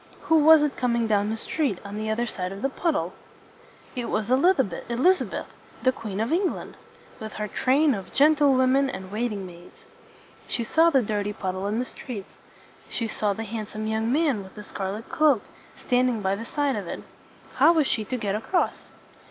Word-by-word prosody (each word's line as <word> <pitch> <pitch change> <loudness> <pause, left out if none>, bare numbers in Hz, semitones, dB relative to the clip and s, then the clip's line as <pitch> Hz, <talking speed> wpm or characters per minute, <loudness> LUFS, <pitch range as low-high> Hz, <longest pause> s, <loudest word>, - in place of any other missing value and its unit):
Who 325 - +3
was 315 0 +8
it 295 -2 0
coming 235 -2 +1
down 210 -1 +1
the 220 - -2
street, 270 - -1
on 200 +1 -7
the 215 +1 -3
other 230 +2 0
side 185 -5 -4
of 195 +1 -8
the 270 - +2
puddle? 315 +2 -1 0.8
It 245 -2 -3
was 215 +2 -1
E - - +6
liz 350 +9 +4
a 265 - +4 0.6
beth, - - -6 0.4
the 255 - +5
Queen 210 -5 -6
of 225 +5 -1
England, 360 +2 -1 0.4
with 220 -1 -7
her 210 0 -3
train 275 +7 +2
of 195 -4 -6
gen 300 +3 +5
tle 290 -1 +4
wom 260 0 +3
en 275 0 +3
and 190 -5 -7
waiting 210 -3 -2
maids. 175 -1 -13 0.7
She 235 - -2
saw 325 +8 +4
the 270 -6 +3
dirty 205 -1 -2
puddle 190 0 -3
in 210 +2 -1
the 250 - -1
street. 225 -6 -7 0.6
She 230 - -2
saw 210 -1 -1
the 225 - -5
handsome 215 0 -5
young 220 +1 0
man 285 -6 +2
with 190 - -14
the 210 - -8
scar 195 -2 -4
let 215 +3 -7
cloak, 295 -8 +3 0.3
stand 250 0 +2
ing 230 -3 -2
by 190 0 +1
the 225 +3 -7
side 285 0 0
of 200 -4 -4
it. - - -6 0.5
How - - +7
was 320 -4 +3
she 220 - 0
to 255 - -3
get 205 -4 -2
across? 225 - -1
230 Hz, 210 wpm, -25 LUFS, 205-275 Hz, 0.8 s, was